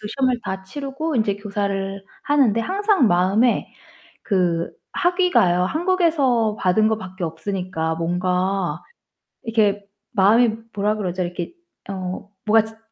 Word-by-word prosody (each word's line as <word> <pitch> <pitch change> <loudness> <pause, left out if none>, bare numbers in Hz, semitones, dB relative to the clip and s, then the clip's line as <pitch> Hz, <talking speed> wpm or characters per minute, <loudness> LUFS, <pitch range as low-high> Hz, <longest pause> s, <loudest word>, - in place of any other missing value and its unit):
그 210 - -6
시험을 255 0 0
다 190 0 -4
치르고 275 +8 -4
인제 210 -3 +1
교사를 200 -1 -3 0.2
하는데 275 - +3
항상 390 - +2
마음에 195 +7 +2 0.5
그 175 -5 0 0.2
학위가요, 350 - +3
한국에서 310 - +2
받은 190 +4 +3
거 220 - 0
밖에 185 -2 -6
없으니까 165 -1 -3
뭔가 180 0 -1 0.6
이렇게 210 -4 +1 0.2
마음이 220 +3 +4 0.2
뭐라 210 +1 +1
그러죠? 185 -3 -2
이렇게 175 - -5 0.4
어 190 +1 -5 0.2
뭐가 220 +1 +4
자 220 0 -12
205 Hz, 275 characters per minute, -22 LUFS, 185-245 Hz, 0.6 s, 마음이